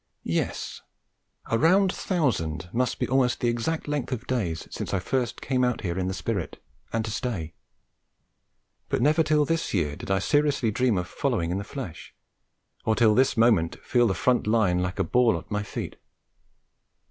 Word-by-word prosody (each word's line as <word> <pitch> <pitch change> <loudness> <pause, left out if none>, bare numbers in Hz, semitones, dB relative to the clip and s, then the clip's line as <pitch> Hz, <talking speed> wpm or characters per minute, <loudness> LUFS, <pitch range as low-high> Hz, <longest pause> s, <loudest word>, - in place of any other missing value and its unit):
Yes; - - -2 0.6
a 115 - 0
round 185 +4 +4
thousand 95 - -1
must 125 +2 0
be - - -1
almost 130 -1 +2
the 120 - +1
exact 120 +9 -2
length 145 -3 -2
of 125 -1 -3
days 95 -11 -2
since - - -3
I - - +1
first 125 +5 -2
came 130 0 0
out 125 -1 +1
here 90 -2 -2
in 90 - -1
the 95 - -2
spirit, - - -3 0.3
and 115 -1 -1
to 110 - -4
stay. 105 - -3 1.4
But - - +1
never 155 +3 +4
till 150 -2 +3
this 165 -6 -1
year 75 -5 0
did - - -9
I 95 - +3
seriously 145 - +2
dream 120 -1 +2
of 90 0 -2
following 110 - -1
in 95 - -1
the - - -4
flesh, 125 - -8 0.7
or 110 - +2
till 110 -1 +5
this 130 +2 +3
moment 110 -8 +3
feel 120 -1 +3
the 95 - 0
front 125 -4 +1
line 105 -5 +3
like 90 +1 -2
a 95 - +2
ball 115 +2 +3
at 85 - -11
my 105 0 0
feet. 105 - -6
115 Hz, 180 wpm, -26 LUFS, 95-130 Hz, 1.4 s, till